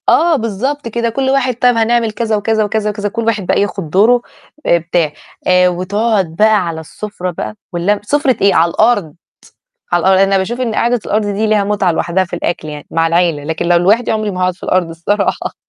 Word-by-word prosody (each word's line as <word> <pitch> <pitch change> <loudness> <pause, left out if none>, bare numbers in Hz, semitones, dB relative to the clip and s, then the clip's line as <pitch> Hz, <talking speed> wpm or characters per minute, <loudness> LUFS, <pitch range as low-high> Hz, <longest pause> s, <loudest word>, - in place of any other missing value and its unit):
آه، 335 0 +4
بالضبط 260 +4 -3
كده، 235 +1 -1
كل 265 +3 -1
واحد 260 -2 +1
طَب 245 +1 +3
هنعمل 230 0 +1
كذا، 220 0 -1
وكذا، 215 +1 0
وكذا، 210 0 -1
وكذا، 205 0 -3
كل 230 +3 -3
واحد 215 -4 0
بقى - - +1
ياخد 195 -5 -3
دوره، 220 +8 +4 0.4
آآ، 170 - +4
بتاع، 170 -2 -1 0.4
آآ، 180 0 +5
وتقعد 190 0 -1
بقى 210 -1 +3
على 165 -1 -4
السفرة 185 +2 -6
بقى 175 - -6 0.2
والل 190 +4 0
سفرة 275 +2 +1
إيه؟ 200 -1 +4
على 170 +1 +4
الأرض، 205 -9 +1 0.8
على 175 +1 +2
أ 190 0 +5
أنا 195 0 +2
باشوف 235 +7 -2
إن 230 -4 -2
قعدة 240 +1 +1
الأرض 215 0 0
دي 205 +2 -1
ليها 210 -1 +2
متعة 200 -3 +1
لوحدها 170 +3 0
في 175 - -6
الأكل 170 -2 -3
يعني 150 -1 -8
مع 165 0 +1
العيلة، 165 -3 +1
لكن 160 +3 -3
لو 175 0 +4
لوحدي 210 +7 +2
عمري 215 -1 -1
ما 185 - -5
هاقعد 185 0 +1
في - - -18
الأرض 180 -2 0
الصراحة. 195 +5 -2
205 Hz, 205 wpm, -15 LUFS, 175-225 Hz, 0.8 s, آآ